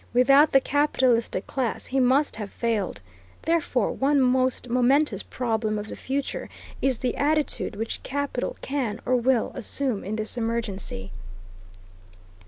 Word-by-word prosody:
Without 275 +4 +6
the 270 - +6
capitalistic 260 -8 +1
class 255 -5 -2
he 270 - -1
must 265 +2 +3
have 210 -2 -5
failed. 220 - -2 0.4
Therefore 320 -9 +1
one 280 +1 +2
most 255 0 +2
momentous 250 -2 +2
problem 220 -3 -2
of 210 +1 -5
the - - -6
future 275 +1 -3 0.3
is 265 -3 +2
the 250 - -2
attitude 300 -4 0
which 225 +2 -4
capital 285 -2 -3
can 255 -6 -2
or 255 - +2
will 245 -1 +2
assume 255 -2 -1
in 210 +3 -3
this 215 +2 -3
emergency. 210 - -3
250 Hz, 135 wpm, -25 LUFS, 225-275 Hz, 0.4 s, Without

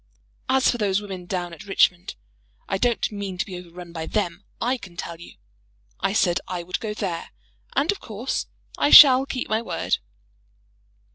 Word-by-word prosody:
"As 265 0 +4
for 240 - -5
those 200 -2 +1
women 190 -4 -8
down 175 -2 -3
at 210 - -11
Richmond, 180 -2 +2 0.5
I 195 - -1
don't 240 -1 +1
mean 200 -3 -5
to - - -1
be 190 - -8
overrun 175 -1 -11
by 160 -1 -5
them, 190 -3 -2 0.2
I 250 +2 0
can 175 -5 -13
tell 170 0 -6
you. 175 - -12 0.7
I - - 0
said 185 -4 +2
I 180 -2 -4
would 180 +1 -3
go 210 -2 -4
there, 180 -6 -4 0.5
and 290 +7 +2
of 405 - -5
course 225 +3 -4 0.3
I - - +3
shall 270 -2 +9
keep 255 -2 -3
my 220 +1 0
word." 230 - -1
195 Hz, 180 wpm, -24 LUFS, 175-230 Hz, 0.7 s, shall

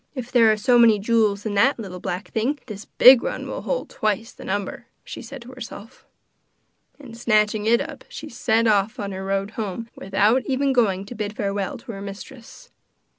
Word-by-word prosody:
'If 255 -2 -6
there 230 -3 +5
are 215 - +1
so 240 +3 +3
many 225 -2 +6
jewels 210 -1 +1
in 215 - -2
that 240 +8 +3
little 190 -5 -7
black 180 +3 -5
thing, 245 +7 0
this 210 -3 -8
big 255 -1 +7
red - - -3
one - - -7
will - - -5
hold - - -3
twice 215 +1 -1
the - - -13
number,' 200 0 -4 0.2
she - - -8
said 275 -3 -9
to 245 - -12
herself; 235 -2 -11 0.9
and 255 -5 -11
snatching 215 -2 +1
it 235 +1 +4
up - - -7
she 310 - -8
set 230 -3 +1
off 215 +3 +2
on 200 -1 -4
her 190 0 -6
road 195 +1 -2
home 220 +1 -5
without 205 +6 +1
even 270 0 +1
going 200 -6 +1
to 205 - -9
bid 210 -2 -5
farewell 200 -1 -2
to 235 +1 -9
her 195 -2 -8
mistress. 230 - -11
220 Hz, 200 wpm, -23 LUFS, 200-245 Hz, 0.9 s, big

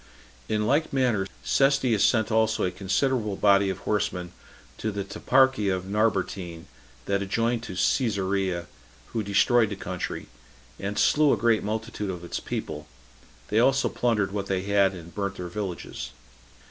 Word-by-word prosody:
In 105 0 +1
like 145 +7 +2
manner, 120 -8 +1 0.2
Cestius 135 -6 +3
sent 110 -2 +3
also 110 0 +2
a 90 - +1
considerable 105 +3 0
body 100 0 +4
of 95 - -2
horsemen 90 -4 -2 0.5
to 110 - -1
the 100 -1 -3
toparchy 130 +1 +2
of 95 -1 -1
Narbatene, 95 -5 -1 0.4
that 100 0 0
adjoined 115 +4 0
to 95 - -7
Cesarea, 95 -5 0 0.5
who 115 - 0
destroyed 105 +3 +3
the 105 - -4
country, 90 -2 -5 0.5
and 100 +1 -4
slew 150 -1 +4
a - - +1
great 115 -2 +3
multitude 110 -1 -3
of 90 -2 -5
its 85 - -4
people; - - -5 0.6
they 110 - +2
also 135 +3 +3
plundered 105 -5 0
what 100 -1 -3
they 95 -1 -1
had, 100 -1 +3
and 85 -1 -11
burnt 100 -1 -3
their 90 -1 -6
villages. 95 -1 -5
100 Hz, 150 wpm, -26 LUFS, 95-115 Hz, 0.6 s, body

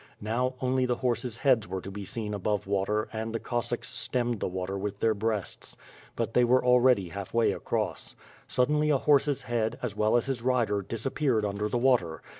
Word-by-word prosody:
Now, 125 +4 -1
only 130 0 +1
the 125 - +1
horses 120 -2 -1
heads 120 -4 +3
were 95 - -3
to 95 - -8
be 100 +1 -6
seen 105 0 -4
above 105 0 -1
water 100 +2 0
and 110 0 -3
the - - 0
Cossacks 120 -1 -3
stemmed 120 -3 -1
the - - -1
water 95 +1 -3
with 100 0 -4
their 110 -1 +3
breasts. 105 -2 -3 0.4
But 115 -1 -2
they 125 - +4
were 125 +1 +3
already 125 -6 +4
half 100 +4 -7
way 115 -1 +4
across. - - -3 0.3
Sud 125 +1 +1
denly 150 0 +2
a 140 - +4
horse's 145 0 +2
head, 115 -1 -1
as 125 - -3
well 110 +2 +3
as 120 - 0
his 135 -4 -2
rider, 115 -5 +1
disappeared 115 +2 -1
under 105 +1 -2
the 120 - 0
water. 120 -11 +1
115 Hz, 200 wpm, -28 LUFS, 105-125 Hz, 0.4 s, they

